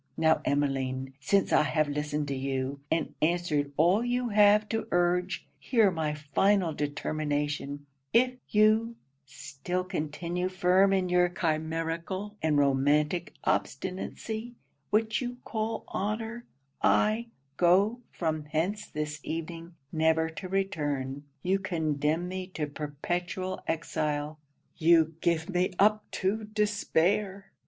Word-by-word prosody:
Now 160 0 +3
Emmeline, 135 -2 -1
since 195 +8 +2
I - - +6
have 155 0 +1
listened 150 0 -2
to 140 - -1
you, 135 +1 -2
and 160 - 0
answered 155 -3 +1
all 180 +8 +4
you 245 0 0
have 210 0 +5
to 225 0 -2
urge, 175 +1 +1
hear 225 -6 +3
my 155 -3 -1
final 165 +4 +2
determination 145 -1 -2 0.3
If 250 +2 +4 0.2
you 215 +2 +3 0.3
still 175 +7 -4
continue 175 +2 -3
firm 185 +1 +4
in 190 -2 +2
your 180 0 +4
chimerical 165 +4 -2
and 155 -2 +2
romantic 145 +4 +2
obstinacy, 220 - -3 0.3
which 220 +2 +1
you 245 0 -4
call 220 0 -2
honour, 220 +4 -3 0.4
I 220 +3 +3 0.3
go 195 +7 +4
from 155 -3 -2
hence 165 +8 -1
this 150 -1 -4
evening, 165 +2 -6 0.2
never 160 0 +2
to 185 +3 -7
return 145 -8 -2 0.2
you 190 +2 +2
condemn 160 -2 -1
me 185 0 -4
to 155 - -1
perpetual 175 +6 -4
exile 155 -2 -2 0.4
you 165 -1 +4
give 165 -1 +1
me 180 -1 0
up 210 +2 +4
to 210 +3 -1
despair!' 205 -2 0
170 Hz, 120 wpm, -29 LUFS, 150-200 Hz, 0.4 s, I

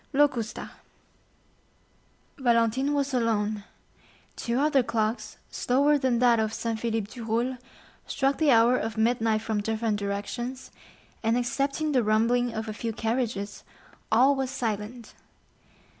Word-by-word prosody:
Locusta 270 -6 +1 1.7
Valentine 240 +2 +2
was 280 -1 0
alone; 215 -4 0 0.7
two 235 +1 -2
other 285 -2 +3
clocks, 225 -1 -2
slower 280 +4 +2
than 260 -3 +1
that 240 -1 +4
of 220 0 -1
Saint 225 -1 -2
Philippe 225 -2 -2
du 240 - -7
Roule, 235 +3 -1 0.5
struck 275 0 0
the 310 -2 +3
hour 235 0 +5
of 220 0 -4
midnight 225 -1 +1
from 220 -2 -1
different 220 0 -1
directions, 240 +6 -4 0.5
and 225 +1 +2
excepting 275 +5 -1
the 260 -3 +3
rumbling 230 +3 +2
of 220 0 -4
a 215 - -4
few 230 +1 -3
carriages 225 -2 -2 0.5
all 255 +5 +5
was 265 -1 -2
silent. 230 -2 -4
235 Hz, 130 wpm, -27 LUFS, 220-260 Hz, 1.7 s, hour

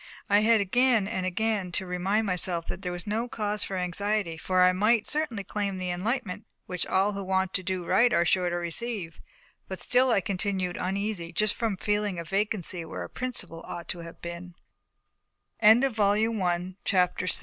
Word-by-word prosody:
I 205 - +7
had 220 +1 +4
again 230 +1 +3
and 185 -4 -2
again 205 -1 -1
to 190 - -2
remind 190 +5 0
myself 180 -3 0
that 180 - -5
there 180 - -3
was 175 0 -6
no 220 +3 -1
cause 210 -5 -2
for 190 - -3
anxiety; 190 0 -1
for 185 +3 -2
that 180 0 +7
I - - +1
might 215 +4 +3
certainly 295 -9 -2
claim 200 -1 -2
the 180 -1 -2
enlightenment 205 +3 -3 0.2
which 180 -1 -3
all 195 +2 +2
who 200 -1 -4
want 190 0 0
to 185 - +2
do 185 -1 -3
right 240 +7 +4
are 170 - +3
sure 180 +1 +2
to 175 - -2
receive; 175 +1 -4 0.5
but - - -6
still 255 +1 +3
I 230 - +4
continued 190 -2 -1
uneasy 190 -2 -2
just 210 +4 +2
from 220 -4 -1
feeling 205 -1 -1
a 170 - -3
vacancy 190 -1 -1
where 160 -1 -6
a - - -8
principle 245 -10 -4
ought 170 -1 -7
to 175 - -2
have 170 0 -10
been. 170 +1 -7 1.1
CHAPT 205 -6 +2
195 Hz, 180 wpm, -27 LUFS, 180-215 Hz, 1.1 s, I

